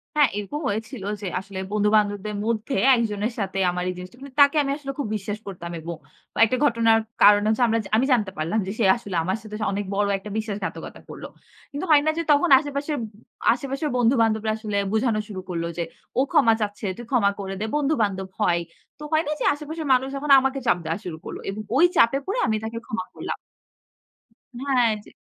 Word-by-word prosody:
হ্যাঁ 295 -4 +5
এরকম 210 +9 -4
হয়েছিল 215 +1 -4 0.2
যে 200 - -4
আসলে 190 0 -8
বন্ধু-বান্ধবদের 210 0 +1
মধ্যে 230 +4 -1 0.2
একজনের 220 -1 -1
সাথে 195 -1 -2
আমার 180 0 -3
এই - - -2
জিনিসটা। 180 +6 -10
মানে 280 -1 -10
তাকে 285 +2 +6
আমি 275 - -1
আসলে 275 -2 -5
খুব 285 - -1
বিশ্বাস 205 +1 -5
করতাম 175 -3 -7
এবং 170 +1 -6 0.4
বা - - -6
একটা 255 +3 -1
ঘটনার 230 -4 +4 0.2
কারনে 205 0 +7
হচ্ছে 220 +3 +2
আমরা 225 0 +2 0.2
আমি 250 - +3
জানতে 210 -6 +1
পারলাম 165 +8 0
যে - - -2
সে 220 - +3
আসলে 205 -6 -7
আমার 190 +5 -1
সাথে 215 0 -9 0.2
অনেক 200 0 -2
বড় 205 0 +2
একটা 195 +2 -9
বিশ্বাসঘাতকতা 210 -3 -5
করল। - - -9 0.5
কিন্তু 290 +6 -4
হয় 295 -1 +7
না 315 - +3
যে 335 - 0
তখন 295 +4 +4
আশেপাশের 290 +1 -3
ব - - -3 0.5
আশেপাশের 275 +4 -3
বন্ধু-বান্ধবরা 225 -3 +2
আসলে 215 -2 -3 0.2
বুঝানো 220 -1 +1
শুরু 190 -3 -6
করল 170 -2 -2
যে, 170 - 0 0.4
"ও - - +6
ক্ষমা 225 - +5
চাচ্ছে 205 0 -3
তুই 240 - -8
ক্ষমা 215 -6 +3
করে 195 -1 -4
দে। 215 - -2
বন্ধু-বান্ধব 220 -11 0
হয়।" 175 -4 +3 0.4
তো - - -9
হয় 315 0 +3
না - - -1
যে - - -1
আশেপাশের 305 +1 -6
মানুষ 260 +1 +2
যখন 280 +1 -1
আমাকে 265 +1 -1
চাপ 230 - +4
দেওয়া 165 +1 -1
শুরু 170 -3 -5
করল। - - -6
এবং 200 +2 -4
ওই 315 +6 +6
চাপে 235 -2 +5
পড়ে 405 +6 -2
আমি 220 -1 +1
তাকে 225 +1 -5
ক্ষমা 225 +1 -4
করলাম। - - -5 1.2
হ্যাঁ, 255 -1 +2 0.2
যে - - -16
220 Hz, 200 wpm, -24 LUFS, 205-270 Hz, 1.2 s, কারনে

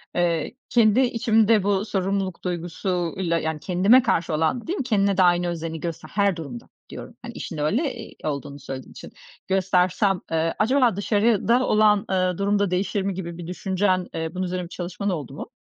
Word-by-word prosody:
eee, 175 +4 0
kendi 230 0 +4
içimde 225 -3 +3
bu 200 +1 +1
sorumluluk 195 -2 -2
duygusuyla, 175 0 -2
yani, 160 -1 -3
kendime 195 - +4
karşı 170 -9 0
olan" 160 - 0
Değil 370 - -2
mi, - - -1
kendine 200 -5 +1
de 185 - +5
aynı 175 0 +3
özeni 165 -1 -4
göster 170 0 -6
her 200 -3 +1
durumda 140 -8 -8 0.2
diyorum. - - -9
Hani, - - -8
işin - - -6
öyle, 230 - 0
eee, 225 -1 -10
olduğunu 140 -1 -4
söylediğin 130 -1 -8
için. - - -11 0.4
"Göstersem, 190 0 +2
eee, 165 0 +1
acaba 245 -1 +3
dışarıda 225 +4 +2
olan, 210 -1 +4
ııı, 185 -1 +1
durum 200 +1 +1
da 200 -3 +1
değişir 195 +2 0
mi?" 195 0 -1
gibi 170 -2 -6
bir 170 -1 -7
düşüncen, 185 0 0
eee, 160 0 -3
bunun 185 - -1
üzerine 180 0 -3
bir 175 - -9
çalışman 185 +3 -4
oldu 145 -7 -4
mu? 155 - -8
185 Hz, 180 wpm, -24 LUFS, 170-205 Hz, 0.4 s, de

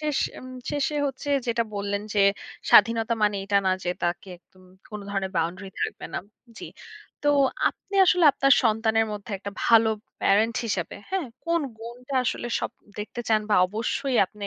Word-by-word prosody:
শেষ 300 -2 -1 0.2
উম 255 - -10 0.2
শেষে 290 0 -1
হচ্ছে 275 +1 -5 0.2
যেটা 235 -1 +1
বললেন 200 0 -2
যে 205 - +3 0.5
স্বাধীনতা 230 +2 +5
মানে 205 -1 +2
এটা 200 0 +1
না - - +4
যে - - -2
তাকে 175 +2 -2
একদম 185 +1 -24 0.3
কোনো 210 -1 -6
ধরনের 195 -1 -2
বাউন্ডারি 180 +4 -2
থাকবে - - -3
না - - 0 0.4
জি। - - -7 0.6
তো 290 - +2 0.4
আপনি 400 - -11
আসলে 360 -1 +4
আপনার 275 0 +3
সন্তানের 225 -1 +2
মধ্যে 205 -1 -7
একটা 200 +1 -6
ভালো 225 -1 +6 0.3
প্যারেন্ট 220 +3 +3
হিসেবে, 195 -6 -3
হ্যাঁ? 380 -5 -1 0.2
কোন 335 0 +2 0.2
গুণটা 245 +4 -8
আসলে 240 - -2
সব - - -3 0.3
দেখতে 210 +3 -5
চান 220 -1 +4
বা - - +5
অবশ্যই 235 +6 -2
আপনে 205 +1 -8
225 Hz, 165 wpm, -25 LUFS, 200-255 Hz, 0.6 s, ভালো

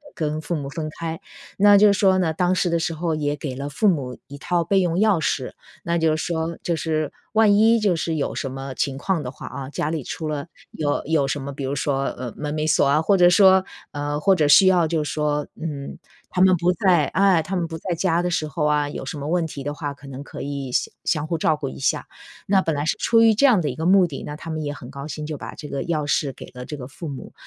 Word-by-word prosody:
跟 155 -3 -2
父 170 +2 -3
母 140 -2 -4
分 155 +1 -4
开。 165 -1 -4 0.4
那 205 0 +7
就 205 0 +6
是 - - -3
说 190 -2 +4
呢， 165 -4 +1
当 180 +2 +1
时 180 - +1
的 170 - +1
时 165 0 -1
候 165 0 -2
也 145 -1 -1
给 140 -2 -5
了 140 +2 -5
父 205 +9 +1
母 130 -7 -2
1 140 0 -9
套 170 +3 0
备 195 +3 +2
用 175 -2 +1
钥 210 -4 +3
匙， 130 -3 -1 0.3
那 170 0 0
就 160 -1 +2
是 155 - -3
说 165 0 -2
就 170 - 0
是 155 -2 -1 0.2
万 215 -2 +5
一 225 +2 +5
就 200 -5 +2
是 160 0 -2
有 145 - -2
什 135 - -3
么 135 0 -6
情 135 -2 -1
况 170 +2 -1
的 125 - -5
话 130 - -10
哦， 135 0 -7
家 150 - -1
里 155 -5 -3
出 155 +2 -5
了 150 +1 -4 0.2
有 145 -2 -1
有 150 -3 +1
什 145 +1 -2
么， 140 +1 -5
比 140 - -6
如 140 +2 -2
说， 135 -1 -1
呃， 125 -3 -5
门 150 0 -4
没 155 0 -1
锁 155 -2 +3
啊， 150 +3 +3
或 195 +5 +3
者 175 0 +6
说 190 +1 +6 0.3
呃， 145 0 -3
或 195 +3 +4
者 150 -4 +2
需 190 +6 +7
要 175 -3 +4
就 155 -2 0
是 150 - -4
说， 150 -1 -1 0.2
嗯， 145 -4 -5 0.3
他 180 - -1
们 185 -1 +6
不 175 +2 +2
在 175 -4 +3
哎， 190 -4 +3
他 190 +4 -4
们 170 -1 -1
不 160 0 -6
在 175 +1 -3
家 175 -1 +1
的 180 - -1
时 155 -2 -1
候 150 +1 -2
啊， 150 -1 +2
有 - - -6
什 150 - -5
么 145 +1 -5
问 170 0 +1
题 140 -3 -7
的 145 +1 -3
话， 145 -2 -5
可 140 0 -15
能 135 +1 -7
可 - - -9
以 140 -2 -4
相 - - -1
相 155 -2 0
互 165 - -1
照 155 -1 +1
顾 140 - -4
一 - - -9
下。 135 - -1 0.4
那 195 -1 +4
本 160 - -1
来 145 +1 -2
是 - - +1
出 230 -1 +4
于 225 -1 +6
这 275 - +4
样 235 -8 +5
的 150 -4 -1
一 125 - -5
个 160 - -4
目 185 -1 +5
的， 140 - -7
那 150 - -6
他 165 - -9
们 155 -1 -3
也 145 0 -3
很 125 -3 -10
高 140 +1 -8
兴， 150 +1 -5
就 155 -1 -5
把 - - -8
这 150 - -8
个 135 - -3
钥 155 -3 -2
匙 140 -2 0
给 - - -10
了 125 0 -8
这 150 - -6
个 125 -1 -7
父 155 +4 -8
母。 135 - -8
155 Hz, 295 characters per minute, -22 LUFS, 145-175 Hz, 0.4 s, 那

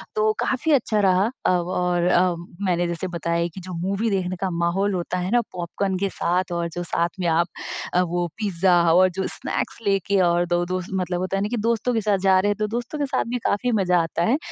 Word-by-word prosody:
तो 215 0 +3
काफ़ी 285 +5 0
अच्छा 230 -6 +2
रहा 190 +2 +3 0.2
अव 180 -1 +1
और 180 -1 0
अ, 180 0 +3 0.3
मैंने 175 -1 +1
जैसे 170 +2 -1
बताया 170 -1 -1
कि 190 - -8
जो 180 0 -8
मूवी 200 +4 0
देखने 185 -2 -1
का 190 - 0
माहौल 175 +4 0
होता 180 0 -2
है 180 +3 -3
ना 240 0 +4
पॉपकॉर्न 185 +2 -2
के 195 +1 -1
साथ 180 -1 0
और 170 -1 -1
जो 175 - -4
साथ 170 0 0
में 180 - 0
आप 170 +1 +2 0.5
अ, 180 - +4
वो 175 0 -1
पिज़्ज़ा 190 -4 +2 0.2
और 185 +1 +5
जो 190 - -1
स्नैक्स - - -1
लेके 195 0 +2
और 175 0 +3
2 175 0 +1
दोस्त 185 0 -4
मतलब 180 -1 -1
होता 185 +1 -2
है - - -1
ना 210 - -2
कि 240 - -2
दोस्तों 230 +2 0
के 225 - +1
साथ 205 -2 +2
जा 190 0 +4
रहे 205 +2 +1
हैं 205 - +1
तो 215 - 0
दोस्तों 240 +6 -4
के 285 - +1
साथ 270 - 0
भी 250 - -1
काफ़ी 245 +5 +1
मजा 180 -2 +3
आता 165 +1 -2
है 250 +10 +3
185 Hz, 235 wpm, -23 LUFS, 175-205 Hz, 0.5 s, और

